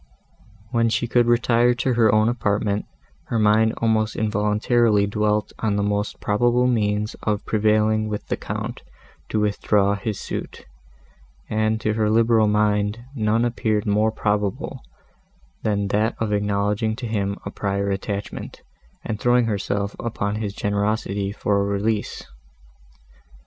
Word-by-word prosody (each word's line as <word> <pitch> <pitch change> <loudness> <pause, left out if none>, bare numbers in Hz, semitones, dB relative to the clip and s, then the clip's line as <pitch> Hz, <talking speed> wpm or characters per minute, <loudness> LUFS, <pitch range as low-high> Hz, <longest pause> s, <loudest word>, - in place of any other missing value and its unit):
When 115 -1 +2
she 115 - 0
could 120 0 +3
retire 120 0 +3
to 125 +1 0
her 115 -3 +4
own 110 +1 +3
apartment, 105 -3 0 0.4
her 115 - -2
mind 110 +1 +3
almost 110 -1 +1
involuntarily 105 0 +2
dwelt 105 0 0
on 105 -2 0
the 100 - 0
most 105 0 -1
probable 120 +4 +2
means 105 -3 0
of 105 -1 -1
prevailing 110 0 +2
with 105 -1 -4
the - - -1
Count - - -5 0.5
to 110 - 0
withdraw 100 -1 +2
his 105 -1 -4
suit, - - -6 0.9
and 110 0 +1
to 110 - 0
her 110 -1 +1
liberal 115 0 +4
mind 105 +2 +1
none 115 -1 +1
appeared 110 -3 0
more 105 +2 +2
probable, 105 -2 -2 0.8
than 100 -2 0
that 105 +2 +1
of 110 -2 -1
acknowledging 105 +1 0
to 125 +1 -6
him 100 -3 -2
a 100 - -4
prior 100 0 -1
attachment 100 +1 -5 0.4
and 110 - -3
throwing 120 +1 +3
herself 100 -1 -2
upon 105 -3 -2
his 105 -2 -4
generosity 100 -1 -1
for 100 0 0
a - - +1
release. 100 +2 -1
105 Hz, 140 wpm, -22 LUFS, 105-110 Hz, 0.9 s, her